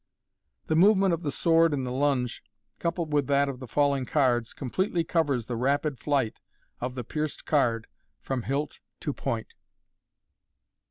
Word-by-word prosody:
The 160 - 0
movement 195 +1 +5
of 165 - -1
the 155 - -2
sword 165 -1 +3
in 135 - -2
the 125 - -3
lunge, 130 -2 0 0.4
coupled 170 -2 -2
with 145 -2 +2
that 140 0 +3
of 135 -2 -5
the 130 - -8
falling 140 0 +1
cards, 120 -5 +2
completely 170 - -1
covers 145 -8 0
the 120 - -3
rapid 140 +3 0
flight 135 -6 0 0.4
of 125 +1 -4
the 125 - -4
pierced 150 +5 -4
card 115 -7 +2 0.3
from 130 - -3
hilt 140 +4 -2 0.2
to - - -2
point. - - -4
140 Hz, 155 wpm, -27 LUFS, 125-160 Hz, 0.4 s, movement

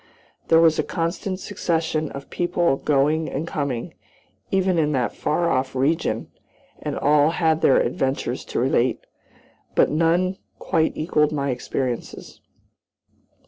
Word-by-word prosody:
There 165 - +5
was 160 -2 +4
a - - +2
constant 185 +3 -3
succession 160 -6 -1
of 140 0 -9
people 175 -5 +1
going 150 +3 +1
and 155 +5 -4
coming, 140 -7 -3 0.6
even 190 -2 +1
in 150 -1 +1
that 125 -3 -1
far 170 +3 0
off 130 +1 -1
region, 140 +5 0 0.5
and - - -3
all 150 +1 +4
had 160 -1 +1
their - - +5
adventures 135 +2 -1
to - - -3
relate. - - +1 0.7
But - - +4
none 170 +4 +2 0.2
quite 160 -1 0
equaled 155 -2 +1
my 140 -2 -1
experiences. 125 0 -4
155 Hz, 130 wpm, -23 LUFS, 140-165 Hz, 0.7 s, There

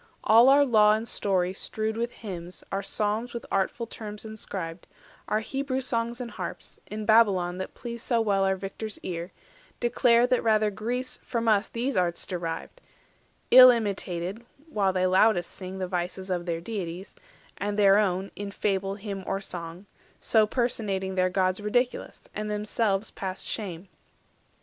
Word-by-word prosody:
All 230 +4 +7
our 285 +1 +6
Law 215 -4 +5
and 220 +2 -2
Story 185 -4 0
strewed 220 +3 -3
With 235 +1 -2
hymns, 180 -6 -8
our 195 - -1
Psalms 215 +4 -2
with 235 - -5
artful 195 +4 0
terms 210 -1 -8
inscribed, 190 -6 -6 0.4
Our 215 - +1
Hebrew 270 +2 -2
songs 235 -2 -2
and 240 -2 -5
harps, - - -6
in 215 0 -5
Babylon 195 -5 +4
That 190 - -6
pleased 235 -1 -7
so 235 -2 +2
well 200 -3 +2
our 190 0 +2
victor's 195 +3 -6
ear, 170 0 -4 0.5
declare 240 0 +4
That 250 0 +2
rather 215 -2 +3
Greece 245 +5 -3
from 230 -1 -2
us 210 -1 +3
these 245 +2 -2
arts 175 -2 0
derived— 175 - -5 0.7
Ill 255 0 +11
imitated 200 -3 -1 0.3
while 200 -8 +1
they 185 0 +1
loudest 185 -1 +3
sing 185 0 -7
The 185 -1 -2
vices 180 +1 -3
of 175 -1 -2
their 165 -1 -2
deities, 185 -2 -5 0.5
and 205 +1 -2
their 200 -1 +6
own, 190 -1 0
340 - - -7
In 205 - -4
fable, 195 -1 -1
hymn, 200 -2 -6
or 195 - -1
song, 175 -1 -7 0.3
so 220 -2 +3
personating 210 -6 -1
Their 185 0 +2
gods 185 +1 0
ridiculous, 245 +4 -1
and 210 0 -3
themselves 210 -1 0
past 190 -1 -5
shame. 190 -4 -4
205 Hz, 160 wpm, -27 LUFS, 185-230 Hz, 0.7 s, Ill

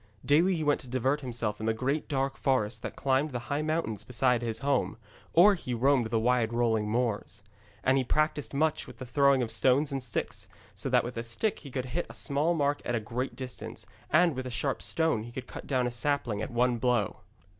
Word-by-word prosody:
Daily 170 +6 +4
he 160 - -2
went 145 -1 +2
to - - -10
divert 130 +4 0
himself 115 -5 -3
in 110 - -3
the 110 - +1
great 135 +6 -1
dark 135 -2 -1
forest 125 -4 0
that - - -6
climbed 135 +2 +1
the 125 - -2 0.2
high 145 - 0
mountains 155 -9 -2
beside 125 -1 +1
his 115 0 -2
home, 140 -4 0 0.4
or 190 +5 +7
he 125 -9 -4
roamed 130 0 +3
the 115 0 0
wide 120 -1 +2
rolling 110 -3 +1
moors. 110 -3 -2 0.4
And 130 +1 +3
he - - +1
practised 155 +2 0
much 155 +2 0
with - - -11
the 130 - -7
throwing 140 0 +3
of 115 - -3
stones 135 +5 +3
and 135 -1 -2
sticks, 120 -4 -4 0.3
so 100 +7 -3
that 125 -1 +4
with 120 0 -6
a 115 - -2
stick 120 - -1
he 140 - -10
could 130 0 -3
hit 140 +8 -3
a - - -10
small 155 +4 +1
mark 145 -1 +1
at 120 - -1
a - - +1
great 120 +5 -4
distance, 130 -2 -7 0.2
and 170 -1 +4
with 130 0 -4
a - - -4
sharp 135 +2 -2
stone 160 -9 +1
he 120 +2 -8
could 130 +1 -6
cut - - -9
down 130 -3 +1
a 125 - -1
sapling 120 -4 0
at - - -3
one 120 0 +1
blow. 120 -4 +1
130 Hz, 225 wpm, -29 LUFS, 120-145 Hz, 0.4 s, or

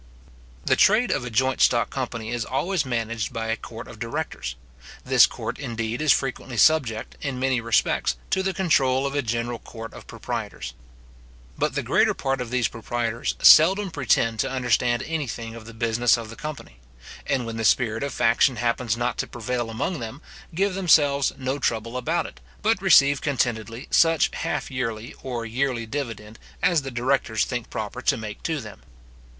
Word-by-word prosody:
The - - +4
trade 215 +5 +4
of - - 0
a - - -4
joint 130 +3 +1
stock 120 -1 +3
company 120 -4 -4
is 120 -1 -1
always 160 +3 -1
managed 115 -2 -2
by 115 0 -4
a 115 - +1
court - - -9
of - - -12
directors. 60 0 -4 0.5
This - - +6
court, - - -6
indeed, 115 +2 -3
is 155 -2 +4
frequently 130 -2 -1
subject, 125 -7 +2
in 135 -3 -3
many 130 -2 +1
respects, 115 - +1 0.2
to 190 - +2
the 190 0 0
control 140 -8 +2
of 140 - -2
a 145 - +1
general 115 0 -2
court 115 -1 -9
of - - -12
proprietors. 60 - -5 0.8
But - - -1
the - - -1
greater - - +2
part 135 -1 -1
of 120 - -5
these 125 -1 +1
proprietors 115 0 -3
seldom 190 +4 +7
pretend 115 -5 +1
to 135 - +1
understand 120 -2 +1
any 160 -3 -3
thing 115 0 -6
of 115 -1 -10
the - - -8
business 115 +1 +2
of 115 -1 -7
the - - -9
company; 150 - -8 0.5
and 130 -3 0
when 115 0 -5
the 115 - -2
spirit 110 -1 +2
of 140 0 -2
faction 120 +3 +3
happens 115 -1 -1
not 120 0 -2
to - - -1
prevail 120 0 -3
among 140 +9 -2
them, 115 +4 -6 0.4
give 195 +2 +1
themselves 150 -7 +3
no 130 +1 -2
trouble 115 -2 -1
about 160 +7 -1
it, - - -10 0.2
but 220 -2 +2
receive 145 -7 +5
contentedly 120 -3 -2
such 165 -1 +4
halfyearly 120 -4 -3
or 120 -3 -4
yearly 120 0 -1
dividend 115 -4 -6 0.2
as 175 -3 +3
the 135 - -6
directors 125 -2 0
think 120 -2 -4
proper 110 +4 -5
to - - +2
make 110 -2 -7
to 160 -2 -2
them. 105 -5 -10
125 Hz, 180 wpm, -24 LUFS, 115-140 Hz, 0.8 s, seldom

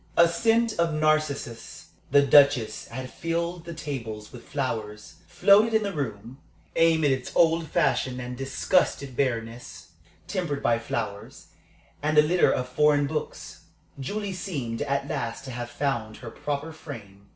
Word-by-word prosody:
A 170 - +7
scent 225 +4 +1
of 165 -2 +2
narcissus 155 -6 -1 0.2
the 140 - +5
Duchess 140 -4 +4
had 130 +1 -7
filled 170 +1 -3
the 170 - -6
tables 115 -9 -6
with 125 - -12
flowers 110 -6 -4
floated 200 +6 +4
in 220 - +3
the 200 -1 -3
room. 125 -3 -5 0.4
Amid 160 -3 +4
its 130 -1 -2
old 165 -1 +3
fashioned 130 -3 +1
and 125 0 -5
distinguished 135 0 0
bareness 115 -9 -3 0.4
tempered 170 -8 -2
by 115 -1 +3
flowers, 110 -3 -5 0.5
and 155 +1 0
a 150 - +8
litter 175 +4 +3
of 125 -1 -1
foreign 145 +2 +3
books 150 +2 -5 0.3
Julie 200 +8 -3
seemed 140 - -4
at 140 -1 -1
last 115 -1 -4
to 130 - -6
have 120 0 -5
found 120 -5 -2
her 120 -2 -9
proper 145 +2 -4
frame. 100 -11 -11
140 Hz, 145 wpm, -26 LUFS, 120-165 Hz, 0.5 s, a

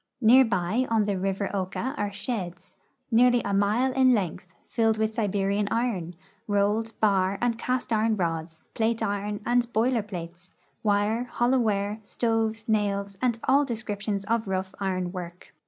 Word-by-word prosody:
Near 255 +2 +7
by 220 +4 0
on 220 -2 +2
the 205 - 0
rivpr 195 +1 -2
Oka 200 +7 -2
are 205 -4 -2
sheds, 200 -3 -5 0.4
nearly 245 +1 +4
a - - -1
mile 215 +6 +2
in 255 -1 +5
length, 185 -3 -3 0.2
filled 225 -2 +1
with 220 0 0
Siberian 200 -2 0
iron, 210 -8 -1 0.3
rolled, 210 +2 0
bar, 195 -2 +2
and 240 0 +1
cast 250 -1 -1
iron 220 0 +2
rods, 165 -2 -3
plate 225 0 0
iron, 205 +1 -2
and 240 0 +1
boiler 235 +2 +2
plates, 180 -3 -9 0.3
wire, 210 +3 +1
hollow 245 +1 +1
ware, 210 -2 0
stoves, 225 +1 -1
nails, 200 -2 0
and 245 -3 +1
all 280 +2 +4
descriptions 210 -5 -3
of 225 0 0
rough 190 0 -2
iron 185 -2 -1
work. 175 -1 -8
210 Hz, 155 wpm, -26 LUFS, 195-230 Hz, 0.4 s, Near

